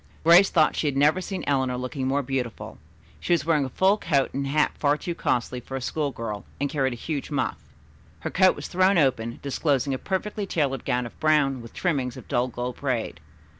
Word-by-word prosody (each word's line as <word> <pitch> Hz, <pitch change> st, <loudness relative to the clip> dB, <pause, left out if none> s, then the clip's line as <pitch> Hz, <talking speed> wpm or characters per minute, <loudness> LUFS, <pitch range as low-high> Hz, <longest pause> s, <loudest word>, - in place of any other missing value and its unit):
Grace 170 Hz, +4 st, +7 dB
thought 155 Hz, -3 st, +3 dB
she 155 Hz, -, 0 dB
had 140 Hz, -2 st, -1 dB
never 150 Hz, +6 st, +4 dB
seen 190 Hz, 0 st, -5 dB
Eleanor 130 Hz, -3 st, 0 dB
looking 130 Hz, +1 st, -3 dB
more 140 Hz, +2 st, +1 dB
beautiful. 125 Hz, -3 st, -4 dB, 0.4 s
She 175 Hz, -, 0 dB
was 165 Hz, -4 st, +1 dB
wearing 155 Hz, -4 st, +2 dB
a -, -, -5 dB
fur 190 Hz, -, +3 dB
coat 145 Hz, -9 st, 0 dB
and 140 Hz, 0 st, -2 dB
hat 150 Hz, +2 st, +2 dB
far 145 Hz, 0 st, +2 dB
too 175 Hz, +2 st, -4 dB
costly 125 Hz, -5 st, -1 dB
for 130 Hz, +2 st, -8 dB
a -, -, -2 dB
school 145 Hz, +3 st, -1 dB
girl, 110 Hz, -5 st, -5 dB, 0.2 s
and 145 Hz, -1 st, -1 dB
carried 135 Hz, -3 st, 0 dB
a -, -, -5 dB
huge 140 Hz, +3 st, -4 dB
muff. 145 Hz, -, -1 dB, 0.6 s
Her -, -, -4 dB
coat 185 Hz, 0 st, +4 dB
was -, -, -6 dB
thrown 185 Hz, +1 st, +3 dB
open, 120 Hz, -6 st, +1 dB
disclosing 140 Hz, -1 st, 0 dB
a 130 Hz, -, -3 dB
perfectly 200 Hz, +1 st, -3 dB
tailored 140 Hz, -8 st, -1 dB
gown 125 Hz, -2 st, 0 dB
of 120 Hz, -, -11 dB
brown, 145 Hz, -4 st, +2 dB
with 115 Hz, -, -12 dB
trimmings 135 Hz, -9 st, -1 dB
of -, -, -11 dB
dull 120 Hz, +1 st, +1 dB
gold 125 Hz, 0 st, -5 dB
braid. 120 Hz, -, -2 dB
140 Hz, 210 wpm, -25 LUFS, 125-160 Hz, 0.6 s, Grace